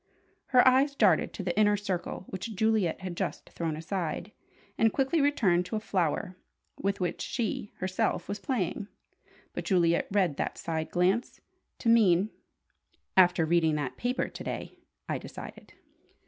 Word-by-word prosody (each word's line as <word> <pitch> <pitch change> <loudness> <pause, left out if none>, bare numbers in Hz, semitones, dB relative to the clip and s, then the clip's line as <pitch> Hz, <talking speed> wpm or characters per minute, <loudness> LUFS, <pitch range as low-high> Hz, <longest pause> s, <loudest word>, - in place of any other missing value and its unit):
Her 255 -1 +5
eyes 270 +2 +4
darted - - +3
to 195 - -5
the 175 -1 -2
Inner 210 0 +4
Circle 190 -2 -4
which 205 +4 -5
Juliet 215 -5 +1
had 185 -2 -5
just - - -4
thrown 165 -2 -2
aside, 170 +3 -3 0.4
and 225 0 +3
quickly 275 +6 +1
returned 195 -12 +2
to 200 - -4
a - - 0
flower 180 -3 -1 0.4
with 200 0 -2
which 180 -2 -2
she 220 -3 -3
herself 185 -1 -1
was 205 - -4
playing. 205 -5 -2 0.7
But - - -5
Juliet 170 -5 +2
read 190 -7 +1
that - - -2
side 160 -1 -3
glance 185 +8 +1 0.4
to - - -5
mean 210 -4 +5 0.8
"After 180 -3 +5
reading 160 -1 +3
that 145 -4 -3
paper 245 +1 -1
to - - -9
day, - - -6 0.3
I - - -2
decided." - - -10
190 Hz, 150 wpm, -29 LUFS, 175-220 Hz, 0.8 s, Her